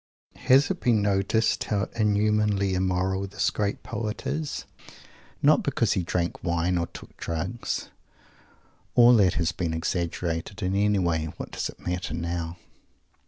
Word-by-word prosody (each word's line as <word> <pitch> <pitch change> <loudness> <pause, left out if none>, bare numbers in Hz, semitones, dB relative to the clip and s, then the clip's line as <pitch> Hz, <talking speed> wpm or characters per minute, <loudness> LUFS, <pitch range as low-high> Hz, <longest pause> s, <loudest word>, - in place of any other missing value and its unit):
Has 135 +7 +6
it 185 - -3
been 115 -4 +2
noticed 100 +3 +1
how 100 -1 0
inhumanly 105 -2 +2
immoral 95 +1 0
this 95 - 0
great 100 -1 -2
poet 105 -1 -4
is? 155 -2 -3 0.8
Not - - +6
because - - +1
he - - 0
drank 85 0 -2
wine 85 0 +1
or 85 - -1
took - - -12
drugs. 85 +8 -3 1.0
All 120 0 +8
that 95 -4 +4
has 85 0 +1
been 85 -3 -2
exaggerated, 85 +3 -2
and, 95 +1 0
anyway, 95 -6 +2
what - - -7
does - - -3
it - - -12
matter 90 -3 -2
now? 85 0 -3
95 Hz, 140 wpm, -26 LUFS, 85-105 Hz, 1.0 s, All